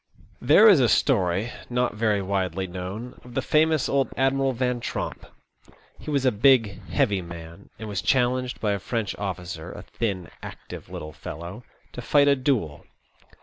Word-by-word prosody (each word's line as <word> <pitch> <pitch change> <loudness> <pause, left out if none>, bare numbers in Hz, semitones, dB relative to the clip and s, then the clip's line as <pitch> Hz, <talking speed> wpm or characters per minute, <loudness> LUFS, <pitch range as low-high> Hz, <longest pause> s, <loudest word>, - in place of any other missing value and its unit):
There 155 - +7
is 195 -8 +7
a 120 -3 +4
story, 100 -3 +2 0.2
not 125 -1 0
very 105 -2 0
widely 95 -1 -1
known, 95 +7 -7
of 125 -1 -13
the - - +1
famous 155 -1 +2
old 135 -3 +1
Admiral 135 0 +2
Van 125 0 -1
Tromp. - - -5 0.7
He - - -8
was 140 -3 0
a 130 - +5
big, 115 -3 +3
heavy 105 -9 +1
man, 85 +1 -10
and 110 - -7
was 100 -2 -3
challenged 125 -1 +1
by 105 - 0
a 100 - -1
French 110 -1 -3
oflScer, 90 -4 -5
a - - -9
thin, 95 -7 -4
active, - - -10
little 75 0 -7
fellow, 85 +9 -8 0.3
to 125 - -6
fight 145 +3 +3
a 140 - +5
duel. 125 - -1
115 Hz, 165 wpm, -25 LUFS, 95-130 Hz, 0.7 s, There